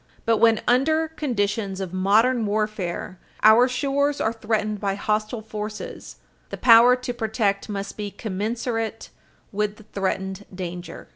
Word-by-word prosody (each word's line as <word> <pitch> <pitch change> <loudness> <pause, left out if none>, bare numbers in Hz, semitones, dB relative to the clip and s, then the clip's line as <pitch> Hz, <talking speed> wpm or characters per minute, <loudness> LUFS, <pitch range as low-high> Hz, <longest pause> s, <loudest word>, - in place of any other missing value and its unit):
But 225 -1 +3
when, 225 -1 +4
under 315 +6 +3
conditions 210 -9 -2
of 190 -2 -5
modern 220 +6 +3
warfare, 205 -4 -3 0.2
our 220 +4 +7
shores 280 +2 0
are 220 - 0
threatened 215 -2 -2
by 195 -1 -1
hostile 215 +2 -2
forces, 210 0 -7 0.3
the - - -6
power 240 +1 +7
to 250 -1 -5
protect 220 -3 -1
must 200 -1 -5
be 210 -1 -4
commensurate 225 +3 -3 0.4
with 210 0 -1
the 215 - -16
threatened 195 -1 -3
danger. 180 -1 -7
215 Hz, 135 wpm, -23 LUFS, 200-235 Hz, 0.4 s, our